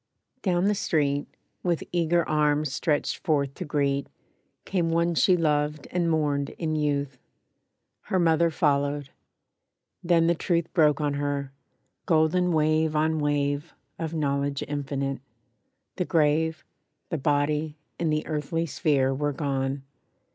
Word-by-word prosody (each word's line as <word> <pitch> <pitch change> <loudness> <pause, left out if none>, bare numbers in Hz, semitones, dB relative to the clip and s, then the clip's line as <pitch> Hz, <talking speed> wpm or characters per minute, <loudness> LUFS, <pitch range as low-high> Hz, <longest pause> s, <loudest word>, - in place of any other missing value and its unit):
Down 180 -2 +1
the 210 - +3
street, 145 -7 0 0.3
With 175 -2 0
eager 170 -1 +1
arms 150 -2 +1
stretched 150 0 0
forth 140 -5 0
to 180 - -6
greet, 140 -2 0 0.6
Came 175 -4 0
one 170 +1 +2
she 180 +2 +4
loved 150 -2 0
and 175 -2 +1
mourned 145 -3 0
in 155 -2 -1
youth; 140 -3 -1 0.9
Her 190 - 0
mother 170 -1 +3
followed; 145 -3 0 0.9
then 170 -1 +3
the 170 - +4
truth 170 0 -1
Broke 155 -4 +4
on 145 -1 0
her, 140 -1 -2 0.6
golden 170 +2 +3
wave 155 0 +2
on 155 +1 +1
wave, 145 +1 -1 0.2
Of 165 0 -3
knowledge 140 -2 -1
infinite. 140 -2 -3 0.8
The 180 - 0
grave, 160 -1 +1 0.4
The 165 -5 -2
body 150 +2 0 0.2
and 165 -2 +1
the 155 0 0
earthly 155 +2 -2
sphere 140 -4 +1
Were 145 +2 -1
gone! 135 -1 -2
150 Hz, 130 wpm, -26 LUFS, 145-165 Hz, 0.9 s, she